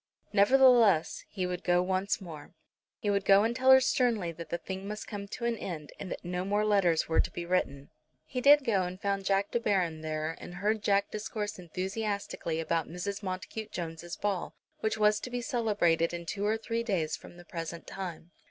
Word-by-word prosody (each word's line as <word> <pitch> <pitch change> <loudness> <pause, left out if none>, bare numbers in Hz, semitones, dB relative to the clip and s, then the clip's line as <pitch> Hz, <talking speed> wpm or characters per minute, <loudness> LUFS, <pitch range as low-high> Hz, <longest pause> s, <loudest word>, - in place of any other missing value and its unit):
Nevertheless, 225 -4 +5
he 185 -3 -3
would 180 0 -4
go 175 0 +3
once 190 +2 0
more. 160 -6 -10 0.4
He 205 -3 -1
would 200 -1 +1
go 195 +1 +6
and 230 +2 0
tell 260 +1 +2
her 265 0 +10
sternly 235 -8 +1
that 165 0 -9
the 170 - -1
thing 190 +2 -6
must 210 +1 -5
come 200 -2 -6
to 235 +3 -5
an 235 -1 +1
end, 160 -8 -6
and 190 - -6
that - - -6
no 180 +1 -2
more 205 +2 +1
letters 195 -6 +3
were 160 - +2
to - - +2
be 170 - -6
written. 140 -6 -1 0.3
He 250 - -4
did 285 +1 +7
go 205 -5 +2
and 180 +1 -4
found 200 -1 -1
Jack 195 +1 +1
De 235 - +1
Baron 180 -8 0
there, 155 +1 -3
and 175 - -9
heard 210 +3 0
Jack 200 0 +2
discourse 210 -1 -4
enthusiastically 190 -1 -3
about 165 0 -1
Mrs. 195 +4 -4
Montacute 200 +3 -5
Jones's 170 0 -5
ball, 200 -4 -2 0.2
which 220 0 -1
was 210 0 +4
to - - -6
be 245 0 -3
celebrated 205 - +1
in 170 0 -6
two 200 +4 -2
or 220 +1 +2
three 230 +1 -2
days 185 -9 -1
from 175 - -13
the 175 - -13
present 165 0 -6
time. 175 -3 -7
195 Hz, 205 wpm, -30 LUFS, 175-215 Hz, 0.4 s, her